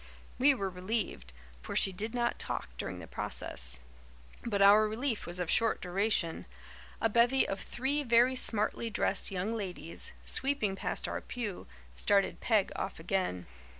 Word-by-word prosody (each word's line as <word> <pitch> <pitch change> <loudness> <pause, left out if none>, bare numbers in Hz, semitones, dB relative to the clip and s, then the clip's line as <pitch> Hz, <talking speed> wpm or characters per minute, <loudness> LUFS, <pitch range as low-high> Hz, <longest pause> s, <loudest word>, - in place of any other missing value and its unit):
We 275 +2 +5
were 195 -5 -3
relieved, 180 - -3 0.3
for - - -6
she 195 - +3
did 215 +5 -4
not 240 0 0
talk - - -2
during - - -5
the - - -8
process; - - -1 0.6
but 210 -4 -1
our 205 +2 +7
relief 225 0 -2
was 175 +1 -1
of 180 - -1
short 225 -1 +2
duration. 185 -2 0 0.5
A 225 - +3
bevy 235 +4 +3
of 195 - -3
three 275 +4 -1
very 245 0 +4
smartly 225 -1 +2
dressed 215 - +1
young 195 +3 -2
ladies, 180 -5 -4
sweeping 265 -8 +1
past - - -3
our - - -3
pew, 220 -7 -6 0.3
started 200 -1 +2
Peg 215 -5 +2
off 190 - -4
again. 165 - -2
210 Hz, 150 wpm, -31 LUFS, 185-235 Hz, 0.6 s, our